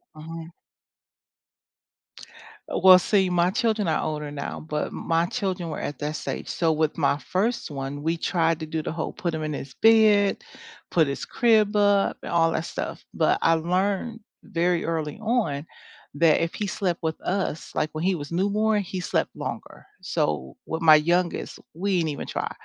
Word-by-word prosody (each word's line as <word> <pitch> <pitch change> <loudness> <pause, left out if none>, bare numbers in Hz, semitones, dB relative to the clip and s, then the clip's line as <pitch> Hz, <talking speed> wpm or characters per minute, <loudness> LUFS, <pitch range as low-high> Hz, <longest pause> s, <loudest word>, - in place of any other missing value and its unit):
Mhm. 165 +1 -8 2.2
Uh, - - 0
well, 185 -1 +10
see, 190 0 +2
my 175 0 +2
children 220 -3 0
are 155 - +1
older 150 -1 -3
now, 140 -1 -5
but 150 -1 -3
m - - -8
my 165 +1 +2
children 185 -5 -3
were - - -4
at 145 - -5
that 150 +1 -3
stage, - - -5
so 165 -2 +1
with 155 0 0
my 145 -2 +2
1st 190 - -2
one, 140 +1 -5
we 165 +1 0
tried 165 -1 +1
to 160 - -4
do 160 0 -3
the - - -3
whole, 165 -1 -4
put 170 -2 -3
him 155 -1 -3
in 150 -1 -3
his 140 -1 -7
bed, 215 -3 +4 0.5
put 160 -4 +3
his 140 - -4
crib 220 -3 +3
up, 205 -1 +3
and - - -6
all 165 -1 +3
that 165 - -2
stuff, - - -5
but - - +2
I 165 - +4
learned 190 +7 -1 0.2
very 170 0 0
early 160 +1 -2
on, 215 - 0 0.5
that 160 +1 +4
if 165 - -1
he 210 - -2
slept 185 -3 -1
with 160 0 -2
us, 185 -5 -2
like, 155 - 0
when 155 +2 -4
he 190 0 +2
was 145 0 -7
newborn, 205 +4 +1
he 185 0 -5
slept 180 - 0
longer. - - -7 0.2
So, 70 -4 -2
with 160 +1 -4
my 155 -1 +8
youngest, 170 +3 0 0.2
we 190 +1 0
didn't 160 -2 0
even 145 - -5
try. - - -3
170 Hz, 185 wpm, -25 LUFS, 155-195 Hz, 2.2 s, well